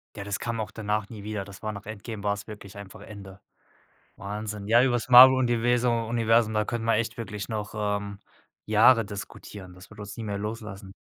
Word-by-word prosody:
Ja, 100 - -7
das 100 0 -3
kam 115 -1 -3
auch 110 - -4
danach 105 -1 -3
nie 105 -3 -9
wieder. 105 -2 -4
Das 100 +1 -13
war 110 - -2
nach 100 -1 -9
„Endgame“ 110 0 -7
war's 100 0 -2
wirklich 105 -2 -11
einfach 100 -1 -11
Ende. 100 -2 -11 0.8
Wahnsinn. 105 0 -6
Ja, 120 +2 +6
über 130 -2 +2
das 120 +1 -2
Marvel-Universu 125 -1 +6
Universum, 115 -1 +1
da 105 - +1
können 115 0 -4
wir 115 - +2
echt 115 +1 -2
wirklich 105 -3 -6
noch, 105 -2 -5
ähm, 100 -1 -3 0.5
Jahre 115 +2 +5
diskutieren. 100 -2 -9
Das 90 +1 -15
wird 110 - -15
uns 100 -1 -8
nie 115 - -6
mehr 100 -1 -3
loslassen. 105 -2 -7
105 Hz, 195 wpm, -26 LUFS, 100-115 Hz, 0.8 s, Ja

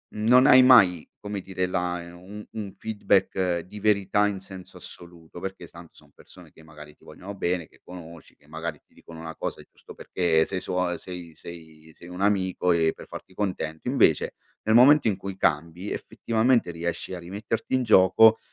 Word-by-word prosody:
non 125 +5 +4
hai 130 -3 +8
mai, 100 -10 +5
come 105 -1 -5
dire, 95 -1 -3
la 90 -1 -2
e 85 0 -11
un 95 +4 -11
un 105 -3 -7
feedback 95 -4 0
di 95 +5 -10
verità 105 -1 +2
in 100 -2 -4
senso 95 -1 -12
assoluto, 85 -1 -12
perché 95 -1 -7
tanto 85 0 -15
son - - -21
persone - - -17
che 80 - -19
magari 75 -1 -14
ti - - -29
vogliono 100 +2 -10
bene, 90 -3 -2
che - - -25
conosci, 85 -3 -12
che 75 - -28
magari 80 +2 -6
ti - - -34
dicono 80 -1 -13
una 80 0 -8
cosa, - - -5
e - - -19
giusto - - -15
perché 80 -3 0
sei 95 - -3
suo 90 0 -2
a 90 -1 -3
sei 90 -3 -9
sei 80 -2 -13
sei 85 - -14
un 90 - -9
amico 95 -3 +1
e 80 -1 +2
per - - -12
farti 95 - -11
contento. 85 -6 -4
Invece, - - +2 0.3
nel 110 - +1
momento 135 +3 +6
in 100 -4 0
cui 95 -1 -7
cambi, 85 +4 -1
effettivamente 115 -4 0
riesci 85 +2 -5
a 90 - -5
rimetterti 105 +8 -4
in 130 - +1
gioco 110 +2 +5
90 Hz, 190 wpm, -25 LUFS, 85-105 Hz, 0.3 s, hai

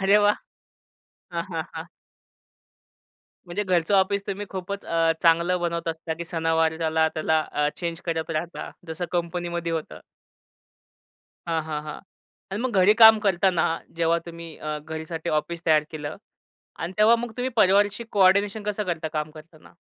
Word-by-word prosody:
अरे 195 +2 +5
वाह! 205 - +4 1.0
हां, - - -1
हां, - - -2
हां. - - -6 1.6
म्हणजे 185 +4 -2
घरचं 180 0 +1
ऑफिस 195 +1 +3
तुम्ही 200 +1 -4
खूपच 195 +1 -5
अ, 165 -1 +2
चांगलं 170 +2 +4
बनवत 170 -1 -2
असता 160 0 -3
की 170 - -4
सणावाराला 160 -1 0
त्याला 160 -1 +2
त्याला 160 0 +2
अ, 150 0 +1
चेंज 170 -1 -4
करत 165 -1 -2
राहता, 165 +2 -4 0.2
जसं 160 +2 -4
कंपनीमध्ये 170 -1 -2
होतं. 160 -1 -4 1.5
हां, 165 -1 0
हां, 150 -1 -4
हां 150 - -6 0.5
आणि 195 +3 -3
मग 255 - 0
घरी 195 +3 +6
काम 220 -1 +10
करताना 185 -1 +3 0.3
जेव्हा 170 0 +3
तुम्ही 170 -1 -9
अ, 150 0 -4
घरीसाठी 160 +2 -6
ऑफिस 165 +3 -2
तयार 155 -2 +5
केलं 150 -1 -6 0.6
आणि 165 +3 -4
तेव्हा 220 +2 +6
मग 235 -1 -5
तुम्ही 250 +1 -1
परिवारशी 205 +2 +3
कोऑर्डिनेशन 200 +2 +3
कसं 210 0 -2
करता 165 -3 -2
काम 150 0 -3
करताना? 155 0 -15
170 Hz, 150 wpm, -25 LUFS, 160-195 Hz, 1.6 s, काम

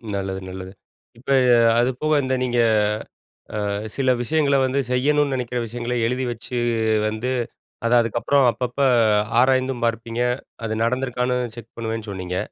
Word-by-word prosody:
நல்லது 95 -1 -3
நல்லது. 95 0 -8 0.5
இப்ப, 130 +3 -13 0.5
அது 120 +2 +3
போக 155 0 +1
இந்த 130 0 -1
நீங்க 120 -1 0 1.1
அ 105 +2 -3
சில 130 -2 +1
விஷயங்கள 140 +1 +2
வந்து 130 +2 0
செய்யணும்னு 145 +2 +2
நெனைக்கிற 125 -1 -3
விஷயங்கள 120 +2 -4
எழுதி 130 +2 -1
வச்சு, 120 +2 -8 0.5
வந்து 110 +4 -3 0.6
அத 115 - +1
அதுக்கப்புறம் 120 +4 +1
அப்பப்போ 125 +4 -1 0.6
ஆராய்ந்தும் 130 -1 +1
பார்ப்பீங்க, 115 +1 -2 0.4
அது 110 - -2
நடந்துருக்கான்னு 125 0 0 0.2
செக் 115 -1 -12
பண்ணுவேன்னு 115 -1 -4
சொன்னீங்க. 90 -1 -4
120 Hz, 130 wpm, -22 LUFS, 115-130 Hz, 1.1 s, அது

